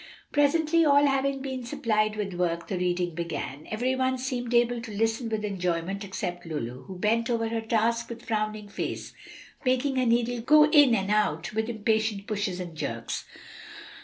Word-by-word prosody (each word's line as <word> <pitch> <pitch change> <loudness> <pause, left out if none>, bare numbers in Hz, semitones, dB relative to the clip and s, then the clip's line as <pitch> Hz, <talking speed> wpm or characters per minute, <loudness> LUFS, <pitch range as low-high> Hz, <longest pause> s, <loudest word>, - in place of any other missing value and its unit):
Presently, 310 +3 +3
all 285 -1 +5
having 275 0 +1
been 260 -2 -4
supplied 215 -2 0
with 205 -3 -3
work, 170 -1 -1
the 190 -3 -2
reading 180 -1 0
began. 155 -3 -5
Every 245 +4 0
one 260 0 +1
seemed 250 -2 -3
able 240 0 +3
to 230 -2 -8
listen 225 +3 0
with 215 -1 -2
enjoyment 185 0 -2
except 185 -3 -4
Lulu, 130 -6 -5
who 190 -2 -8
bent 225 +5 +1
over 230 -1 0
her 225 0 -1
task 230 +1 0
with 235 0 -8
frowning 215 -1 -2
face, 200 - -5 0.5
making 260 +1 +1
her 255 - +2
needle 235 0 +1
go 300 +5 +6
in 290 -6 +6
and 195 0 -1
out 210 -5 +1
with 220 +1 -1
impatient 220 -2 0
pushes 205 -4 -2
and 175 -3 -6
jerks. 115 -6 -4
220 Hz, 170 wpm, -27 LUFS, 190-245 Hz, 0.5 s, go